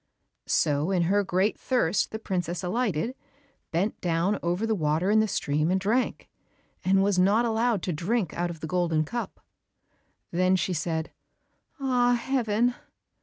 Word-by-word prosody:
So 145 +3 +1
in 185 -3 +2
her 200 +4 +2
great 190 +3 0
thirst 210 -8 +1
the 220 - -5
princess 180 -4 -3
alighted, 215 +1 -1 0.6
bent 185 +6 -1
down 175 +4 0
over 175 +5 -1
the 225 - +1
water 165 +1 +1
in 220 - +5
the 215 - +3
stream 150 -4 0
and 190 +1 +2
drank, 220 +7 0 0.6
and 195 +1 +3
was 200 -2 +2
not 205 +6 +4
allowed 225 -3 +1
to 180 - -1
drink 185 +3 -1
out 175 0 -1
of 165 -2 -8
the - - -4
golden 165 -2 +1
cup. 235 +8 -5 0.9
Then 185 +2 +3
she 185 0 0
said, 160 0 -2 0.7
"Ah, 250 -2 +2
Heaven!" 240 -2 +1
190 Hz, 155 wpm, -27 LUFS, 170-220 Hz, 0.9 s, in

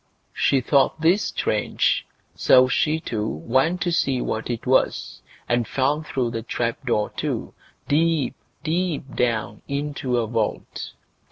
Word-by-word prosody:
She 135 - +2
thought 140 +4 +2
this 175 +6 +3
strange, - - 0 0.3
so 130 0 +5
she 155 +4 +1
too 110 -9 -3
went 130 - 0
to 175 - +1
see 135 -6 +1
what 110 -1 -3
it 120 -2 -3
was, 130 +1 +1 0.3
and 120 -1 +1
fell 140 +3 +1
through 130 -6 -2
the 115 -1 -3
trap 115 +2 -2
door 105 -3 +1
too, - - -3 0.3
deep, 155 -2 +2 0.3
deep 165 -4 -1
down, 115 -3 -1
into 140 -3 -2
a 115 - +1
vault. 110 -1 -3
130 Hz, 140 wpm, -23 LUFS, 120-150 Hz, 0.3 s, so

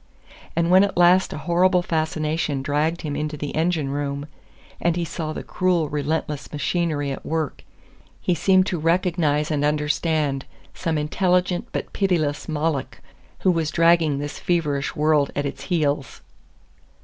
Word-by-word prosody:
And 170 +1 +1
when 185 +2 +7
at 200 -3 -1
last 180 +2 +5
a - - -5
horrible 175 +4 +2
fascination 155 -3 -1
dragged 155 +5 0
him 145 -2 -3
into 150 +1 -3
the 145 0 -4
engine 160 -3 0
room, 140 0 -3 0.6
and 170 -1 +2
he 175 -1 -1
saw 155 -1 -4
the - - -5
cruel 175 -4 0
relentless 150 0 -2
machinery 150 -2 -1
at 135 - -6
work, 160 -3 -3 0.6
he 180 - 0
seemed 185 +3 +3
to 180 -3 -2
recognize 165 -2 +1
and 145 -1 0
understand 150 -1 0 0.3
some 165 -3 -2
intelligent 180 +6 +1
but - - -4
pitiless 165 -8 0
Moloch, 150 -4 -2 0.4
who 185 - +4
was 165 -3 0
dragging 165 -3 +3
this 145 +1 -5
feverish 150 -5 -1
world 150 -2 +3
at 145 - -1
its 135 0 -5
heels. 145 -5 -1
155 Hz, 150 wpm, -23 LUFS, 145-175 Hz, 0.6 s, when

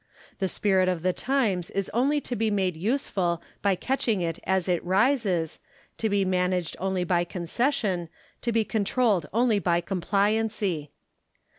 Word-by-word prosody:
The 190 - +1
spirit 190 -1 +2
of 175 -3 -2
the 185 0 +2
times 220 -11 0
is 195 -1 -2
only 275 +6 +2
to 245 - -4
be 220 0 +1
made 190 -4 0
useful 185 - 0 0.2
by 200 -1 +2
catching 235 -1 0
it 165 -2 -2
as 190 -1 +1
it 175 -2 +1
rises, 190 - +1 0.4
to 220 - +1
be 200 -1 +2
managed 180 -2 0
only 190 -1 0
by 175 0 +2
concession, 185 - -1 0.3
to 235 - -1
be 225 -1 +2
controlled 210 -5 +1
only 230 -1 +3
by 175 -3 +2
compliancy. 195 -2 0
195 Hz, 150 wpm, -26 LUFS, 180-225 Hz, 0.4 s, only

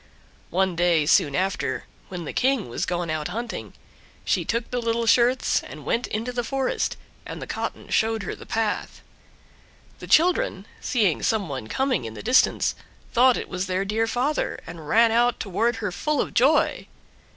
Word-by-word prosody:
One 185 0 +1
day 170 -3 +3
soon 145 -1 +3
after, 190 +3 -1 0.3
when 180 -3 -6
the - - -5
King 260 - +1
was 115 - -3
gone 175 -2 -2
out 155 -1 -2
hunting, 235 +1 -5 0.5
she - - +1
took 235 0 -2
the 245 -1 -1
little 230 0 0
shirts 245 +3 +3
and - - -11
went 235 - 0
into 225 +4 -3
the 245 0 -1
forest, 265 +2 -1 0.3
and - - -7
the - - -6
cotton - - -5
showed 220 -1 +1
her - - -4
the - - -11
path. 220 -2 -2 1.0
The - - -9
children, 365 +10 +3
seeing 210 - +1
some 215 -5 0
one 130 -6 -5
coming 260 - 0
in 110 0 -7
the - - -8
distance, 250 +4 +3 0.4
thought 250 +1 +5
it - - -5
was 185 +1 -3
their 185 +1 -1
dear 220 +3 0
father, 260 +6 -1
and 165 -3 -9
ran 230 0 +5
out 240 +1 +2
toward 225 +5 0
her 210 -4 -3
full 300 +9 -1
of - - -1
joy. 280 +6 +3
225 Hz, 175 wpm, -24 LUFS, 180-245 Hz, 1.0 s, thought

